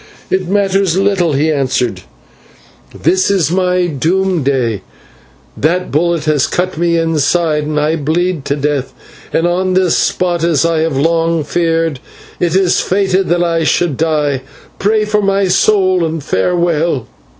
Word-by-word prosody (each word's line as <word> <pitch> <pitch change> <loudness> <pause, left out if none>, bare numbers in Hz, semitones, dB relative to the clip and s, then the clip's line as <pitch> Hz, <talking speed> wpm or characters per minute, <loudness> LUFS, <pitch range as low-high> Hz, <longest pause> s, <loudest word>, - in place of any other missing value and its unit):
"It 190 -1 0
matters 195 -2 +1
little," 190 -5 +1
he 150 +3 +1
answered; 125 -8 -1 1.0
"this 185 +5 +2
is 190 -5 +1
my 180 0 +1
doom 175 +4 0
day, 125 -7 -1 0.7
that 180 +4 -1
bullet 170 +1 0
has 155 -2 +2
cut 180 +1 -2
me 170 +1 +1
inside 165 -1 +1
and 150 0 -1
I 155 +2 0
bleed 165 +2 -1
to 140 - -1
death, 140 -3 -2 0.4
and 165 - +1
on 185 +1 0
this 185 -2 +2
spot, 175 -2 0
as 165 -3 +2
I 165 -1 +1
have 160 -3 -1
long 165 +2 +1
feared, 165 -2 -1 0.4
it 175 -1 0
is 190 -2 +2
fated 190 0 0
that 175 +1 +2
I 165 -1 0
should 160 -1 +1
die. 150 -3 0 0.4
Pray 215 +2 +1
for 210 0 0
my 195 -1 +1
soul, 185 -1 +2
and 160 -2 -3
farewell." 165 - 0
170 Hz, 150 wpm, -14 LUFS, 150-185 Hz, 1.0 s, this